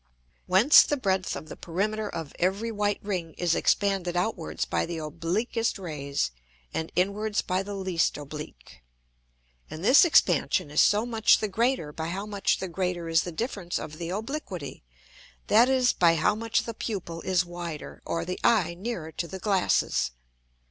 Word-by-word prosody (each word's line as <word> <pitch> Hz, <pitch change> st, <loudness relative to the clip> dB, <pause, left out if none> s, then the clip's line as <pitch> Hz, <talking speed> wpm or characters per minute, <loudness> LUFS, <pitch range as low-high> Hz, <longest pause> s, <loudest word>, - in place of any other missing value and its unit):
Whence 195 Hz, +11 st, +7 dB
the 290 Hz, -, 0 dB
breadth 190 Hz, -6 st, 0 dB
of 155 Hz, -, -7 dB
the -, -, -8 dB
Perimeter 210 Hz, +5 st, -2 dB
of 160 Hz, -3 st, -6 dB
every 200 Hz, +6 st, 0 dB
white 205 Hz, -1 st, 0 dB
Ring 180 Hz, -6 st, -4 dB
is 175 Hz, -2 st, +1 dB
expanded 190 Hz, -3 st, +1 dB
outwards 180 Hz, -2 st, -2 dB
by -, -, -1 dB
the 170 Hz, -1 st, -4 dB
obliquest 170 Hz, +10 st, -2 dB
Rays, 145 Hz, -, -3 dB, 0.4 s
and 160 Hz, -, -3 dB
inwards 205 Hz, +3 st, 0 dB
by 185 Hz, +1 st, 0 dB
the 200 Hz, +1 st, -6 dB
least 185 Hz, -4 st, 0 dB
oblique. 140 Hz, -, -9 dB, 0.9 s
And 160 Hz, +4 st, -6 dB
this 260 Hz, -, +8 dB
Expansion 175 Hz, -, +3 dB
is 150 Hz, -, +4 dB
so 210 Hz, +2 st, +4 dB
much 225 Hz, -3 st, +4 dB
the 215 Hz, -, -2 dB
greater 220 Hz, -, 0 dB
by 160 Hz, +1 st, -4 dB
how 190 Hz, +4 st, -4 dB
much 205 Hz, -2 st, 0 dB
the 190 Hz, -, -4 dB
greater 180 Hz, -1 st, -2 dB
is 165 Hz, 0 st, +4 dB
the 175 Hz, -, -5 dB
difference 200 Hz, -2 st, -3 dB
of 155 Hz, +1 st, -7 dB
the 170 Hz, -1 st, -4 dB
Obliquity; 205 Hz, -, -5 dB, 0.6 s
that 230 Hz, +4 st, +5 dB
is, 255 Hz, -2 st, +3 dB
by 170 Hz, -2 st, +4 dB
how 160 Hz, +6 st, +2 dB
much 225 Hz, +2 st, 0 dB
the 230 Hz, -, -5 dB
Pupil 180 Hz, -7 st, -5 dB
is 185 Hz, 0 st, +1 dB
wider, 175 Hz, -3 st, -7 dB
or 165 Hz, 0 st, -2 dB
the 180 Hz, +1 st, -4 dB
Eye 200 Hz, -7 st, +3 dB
nearer 175 Hz, -4 st, -5 dB
to 170 Hz, -, -4 dB
the 190 Hz, -, -7 dB
Glasses. 190 Hz, -, +1 dB
185 Hz, 170 wpm, -27 LUFS, 165-210 Hz, 0.9 s, this